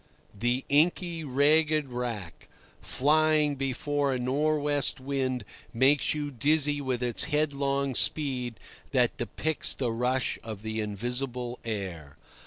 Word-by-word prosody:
The 120 +5 -1
inky 165 +3 +2
ragged 150 +2 +3
wrack, 115 -9 -5 0.3
flying 155 +1 +2
before 135 +1 -1
a - - 0
nor' 145 +5 +1
west 145 -2 +1
wind, 130 -2 -2 0.3
makes 135 +5 +3
you 145 -1 -3
dizzy 145 +2 +1
with 130 -3 -2
its 120 -2 +2
headlong 140 -3 0
speed 125 -4 0 0.3
that 125 -3 +3
depicts 145 +8 -1
the 125 -4 -1
rush 125 +3 0
of 110 -2 -7
the 110 0 -3
invisible 120 +4 -3
air. 95 -10 -5
135 Hz, 120 wpm, -28 LUFS, 120-145 Hz, 0.3 s, ragged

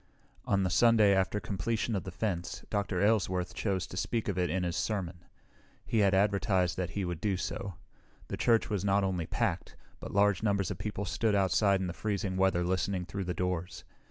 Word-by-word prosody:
On 100 -1 +2
the 90 - 0
Sunday 105 0 +5
after 95 +2 +1
completion 105 +4 -2
of 95 - -3
the 95 - -5
fence, 90 -2 -3
Dr. 100 -3 0
Aylesworth 95 -4 +1
chose 95 -4 -1
to - - -10
speak 115 +4 -1
of 100 - -1
it 90 -1 0
in 95 0 -1
his 85 -1 -2
sermon. 90 -1 -2 0.7
He 115 - 0
had 100 -2 +4
advertised 95 -3 +2
that 90 -2 -2
he 100 - 0
would 85 -2 -4
do 100 -3 0
so. 95 0 -4 0.5
The - - -4
church 115 -2 +2
was 100 -4 -2
not 100 0 +2
only 90 -4 -1
packed, - - -2 0.2
but - - -7
large 100 -2 +3
numbers 100 -3 +1
of - - -5
people 105 -1 -3
stood 105 +4 0
outside 100 0 +3
in - - -1
the 90 - -3
freezing 100 -2 -2
weather 95 -2 +2
listening 90 +1 -1
through 100 +1 -4
the 90 0 -3
doors. 90 -1 -3
95 Hz, 200 wpm, -30 LUFS, 90-105 Hz, 0.7 s, Sunday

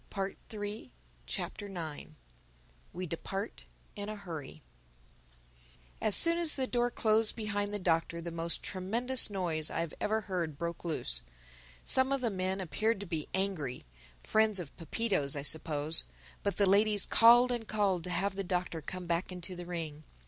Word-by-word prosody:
THE 195 -1 -3 0.2
NINTH 205 - -4 0.4
CHAPTER 200 - -4 1.2
WE 185 +1 -3
DEPART 195 +5 -5 0.3
IN 205 -1 -5
A 215 - -4
HURRY 160 - -8 1.4
AS 210 - +4
soon 335 0 +7
as 335 -3 +4
the 265 - 0
door 245 -1 +1
closed 220 -2 +3
behind 205 -2 -2
the 205 - -1
Doctor 170 -2 0
the 170 0 -5
most 165 0 -1
tremendous 230 +8 +1
noise 170 -6 +1
I - - -1
have 165 -2 -4
ever 220 +1 +1
heard 175 -7 -3
broke 170 +1 -4
loose. 65 - -2 0.6
Some 260 +1 +4
of 275 -1 +1
the 235 -3 0
men 190 0 -1
appeared 205 +5 0
to - - -5
be 160 -4 -4
angry 185 -10 -2 0.4
(friends 215 -2 +3
of 165 -6 -8
Pepito's, 165 -4 +1
I 140 - -3
suppose); 155 0 +1 0.4
but 200 - -1
the 200 - +4
ladies 205 +1 +4
called 240 +2 +7
and 235 -3 -3
called 200 -5 +1
to - - -5
have 190 +3 0
the 195 +1 -3
Doctor 180 -3 -2
come 180 +4 -6
back 170 +2 -1
into 180 +1 -6
the 175 0 -8
ring. 160 -4 -5
190 Hz, 165 wpm, -32 LUFS, 170-215 Hz, 1.4 s, soon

